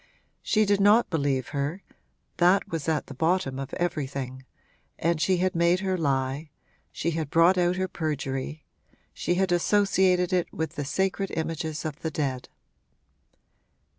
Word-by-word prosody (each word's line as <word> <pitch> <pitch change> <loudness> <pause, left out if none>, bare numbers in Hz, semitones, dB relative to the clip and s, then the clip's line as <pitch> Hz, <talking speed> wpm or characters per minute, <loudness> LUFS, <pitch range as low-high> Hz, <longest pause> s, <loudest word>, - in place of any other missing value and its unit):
She 215 -1 +2
did 200 0 +2
not 210 +3 +5
believe 140 -5 0
her 150 +6 -3 0.5
that 180 +3 +4
was 165 -1 -3
at 155 -2 0
the - - -9
bottom 160 -2 0
of 135 - -5
everything, 135 -6 -3 0.5
and 165 -1 0
she 185 +2 +3
had 185 +1 +1
made 170 +2 +2
her 190 -1 0
lie, 140 -1 -1 0.4
she 170 - -2
had 160 -3 -3
brought 165 +4 +5
out 180 0 +2
her 185 0 -1
perjury, 150 -2 -3 0.5
she 175 - -1
had 190 0 +1
associated 185 -1 +3
it 180 -2 +1
with 160 0 -3
the 145 - -4
sacred 190 +6 -1
images 160 -1 -3
of 155 -1 -4
the 160 - -3
dead. 135 -5 -3
165 Hz, 150 wpm, -26 LUFS, 145-185 Hz, 0.5 s, not